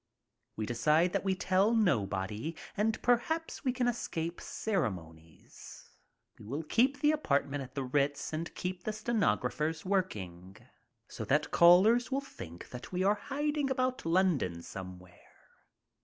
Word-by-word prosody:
We 110 Hz, -, -3 dB
decide 150 Hz, +10 st, +2 dB
that -, -, 0 dB
we 190 Hz, -1 st, +1 dB
tell 190 Hz, +5 st, +2 dB
no 155 Hz, -, +3 dB
body 105 Hz, -, -4 dB, 0.2 s
and 220 Hz, +2 st, +1 dB
perhaps 320 Hz, +7 st, 0 dB
we 260 Hz, -, +2 dB
can 250 Hz, -1 st, 0 dB
escape 170 Hz, -8 st, -3 dB
ceremonies. 85 Hz, -, -5 dB, 0.5 s
We -, -, -12 dB
will 145 Hz, +7 st, -3 dB
keep 260 Hz, -, +2 dB
the 295 Hz, -, +5 dB
apartment 145 Hz, -, 0 dB
at 130 Hz, -1 st, -9 dB
the 135 Hz, -, -1 dB
Ritz 140 Hz, +3 st, 0 dB
and 165 Hz, +2 st, -3 dB
keep 180 Hz, 0 st, -4 dB
the 215 Hz, -, -2 dB
stenographers 205 Hz, -8 st, 0 dB
work 185 Hz, -, +1 dB
ing, 90 Hz, -1 st, -9 dB, 0.5 s
so -, -, -6 dB
that -, -, +1 dB
callers 200 Hz, +9 st, +6 dB
will 270 Hz, -, +1 dB
think 85 Hz, -, -10 dB
that 125 Hz, -, -9 dB
we 185 Hz, 0 st, 0 dB
are 200 Hz, +2 st, +4 dB, 0.2 s
hiding 290 Hz, 0 st, 0 dB
about 255 Hz, -1 st, 0 dB
London 165 Hz, -, +1 dB
somewhere. 90 Hz, -2 st, -10 dB
170 Hz, 145 wpm, -31 LUFS, -, 0.5 s, callers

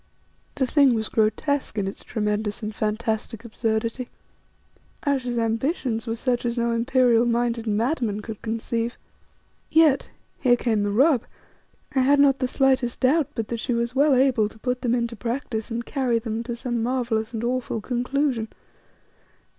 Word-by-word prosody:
The 265 Hz, -, +1 dB
thing 275 Hz, -2 st, +4 dB
was 220 Hz, -1 st, -2 dB
grotesque 225 Hz, +5 st, 0 dB
in 200 Hz, -, 0 dB
its 195 Hz, -, -6 dB
tremendous 210 Hz, 0 st, -2 dB
and 215 Hz, 0 st, -3 dB
fantastic 220 Hz, +1 st, -2 dB
absurdity; 230 Hz, +2 st, -2 dB, 1.0 s
Ayesha's 255 Hz, -4 st, 0 dB
ambitions 230 Hz, +1 st, -1 dB
were 225 Hz, -, -1 dB
such 245 Hz, +1 st, -1 dB
as 240 Hz, 0 st, -2 dB
no 235 Hz, 0 st, +1 dB
imperial 240 Hz, 0 st, +3 dB
minded 235 Hz, -1 st, 0 dB
madman 220 Hz, -1 st, 0 dB
could 220 Hz, -2 st, -7 dB
conceive. 230 Hz, +1 st, -2 dB, 0.7 s
Yet 315 Hz, -4 st, +4 dB, 0.3 s
here 245 Hz, -2 st, +4 dB
came 230 Hz, -3 st, 0 dB
the 205 Hz, -, 0 dB
rub 255 Hz, +4 st, +3 dB, 0.7 s
I 265 Hz, -, +2 dB
had 280 Hz, +2 st, +4 dB
not 275 Hz, -1 st, +5 dB
the 255 Hz, -, +1 dB
slightest 265 Hz, -2 st, +1 dB
doubt 280 Hz, +3 st, +3 dB
but 225 Hz, -2 st, -3 dB
that 235 Hz, -, -3 dB
she 245 Hz, +1 st, -1 dB
was 235 Hz, +1 st, -1 dB
well 280 Hz, +1 st, +4 dB
able 255 Hz, -5 st, +3 dB
to 220 Hz, -, -16 dB
put 250 Hz, +2 st, -2 dB
them 245 Hz, -2 st, +1 dB
into 235 Hz, -1 st, -2 dB
practice 230 Hz, 0 st, -3 dB
and 235 Hz, 0 st, -3 dB
carry 255 Hz, -5 st, 0 dB
them 225 Hz, 0 st, -3 dB
to 240 Hz, -1 st, -3 dB
some 240 Hz, -1 st, -3 dB
marvellous 235 Hz, -2 st, -1 dB
and 225 Hz, -1 st, -4 dB
awful 245 Hz, -1 st, -1 dB
conclusion. 250 Hz, +1 st, -1 dB
235 Hz, 160 wpm, -24 LUFS, 225-260 Hz, 1.0 s, not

